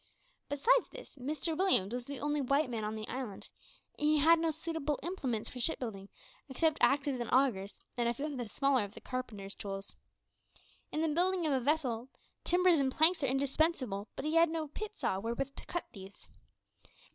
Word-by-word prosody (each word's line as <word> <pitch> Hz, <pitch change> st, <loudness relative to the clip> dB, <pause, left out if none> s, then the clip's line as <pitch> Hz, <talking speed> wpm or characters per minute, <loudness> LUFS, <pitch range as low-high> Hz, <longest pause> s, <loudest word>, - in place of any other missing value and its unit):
Besides 470 Hz, -, +3 dB
this, -, -, -11 dB
Mr 300 Hz, +5 st, -2 dB
Williams 310 Hz, -, +3 dB
was 245 Hz, -1 st, -3 dB
the 280 Hz, -1 st, -6 dB
only 295 Hz, +1 st, 0 dB
white 275 Hz, +1 st, +1 dB
man 225 Hz, -2 st, -2 dB
on 210 Hz, +1 st, -2 dB
the 215 Hz, 0 st, -5 dB
island, 250 Hz, -7 st, -6 dB, 0.5 s
and 300 Hz, -, +2 dB
he 305 Hz, 0 st, +4 dB
had 325 Hz, +3 st, +6 dB
no 330 Hz, 0 st, +1 dB
suitable 320 Hz, -2 st, -2 dB
implements 270 Hz, -, -2 dB
for 250 Hz, -, -7 dB
shipbuilding, 225 Hz, -8 st, -2 dB, 0.4 s
except 315 Hz, +3 st, +1 dB
axes 275 Hz, -2 st, +3 dB
and 240 Hz, -, -3 dB
augurs, 230 Hz, -7 st, +2 dB, 0.2 s
and 235 Hz, -1 st, +2 dB
a -, -, +1 dB
few 280 Hz, -, -3 dB
of 300 Hz, -2 st, -4 dB
the 245 Hz, -4 st, -4 dB
smaller 275 Hz, 0 st, +2 dB
of 205 Hz, +1 st, -8 dB
the -, -, -8 dB
carpenter's 215 Hz, -6 st, -5 dB
tools. 195 Hz, 0 st, -6 dB, 1.0 s
In 310 Hz, -, -1 dB
the 325 Hz, -, +2 dB
building 355 Hz, +3 st, +1 dB
of 300 Hz, -, +2 dB
a 265 Hz, -, +2 dB
vessel, 255 Hz, -3 st, 0 dB, 0.3 s
timbers 355 Hz, -2 st, +4 dB
and 265 Hz, -1 st, +2 dB
planks 320 Hz, +5 st, +4 dB
are -, -, +3 dB
indispensable, 265 Hz, -5 st, 0 dB
but -, -, -5 dB
he 310 Hz, -, 0 dB
had 330 Hz, 0 st, +5 dB
no 320 Hz, -2 st, -3 dB
pit 425 Hz, +7 st, -6 dB
saw 190 Hz, -, 0 dB
wherewith 235 Hz, +6 st, -3 dB
to -, -, -10 dB
cut 345 Hz, -, -3 dB
these. 195 Hz, 0 st, -12 dB
275 Hz, 190 wpm, -33 LUFS, 235-315 Hz, 1.0 s, had